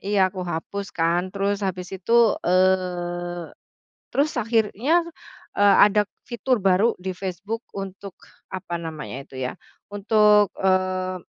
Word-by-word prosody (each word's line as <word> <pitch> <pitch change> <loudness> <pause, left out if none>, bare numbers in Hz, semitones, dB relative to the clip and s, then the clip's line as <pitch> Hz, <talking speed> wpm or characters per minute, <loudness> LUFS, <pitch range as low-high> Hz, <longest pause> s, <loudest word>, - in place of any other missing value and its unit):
iya 195 -2 +1
aku 185 - -6
hapus 180 +3 -4
kan 170 +2 +1
terus 200 +1 -1
habis 185 -1 -4
itu, 230 +4 +3 0.2
eee, 175 -2 0 0.6
terus 285 +3 +2
akhirnya, 230 - +2 0.6
eee, 205 0 +6
ada 210 0 +2 0.2
fitur 240 -1 -1
baru 195 +4 +3
di 185 -1 -4
Facebook 200 +5 -5
untuk 195 0 -7 0.4
apa 180 -2 -4
namanya 155 -5 -7
itu 130 -1 -9
ya 125 +7 -4 0.4
untuk, 210 0 +4
eee, 185 -1 +1
190 Hz, 120 wpm, -23 LUFS, 180-210 Hz, 0.6 s, eee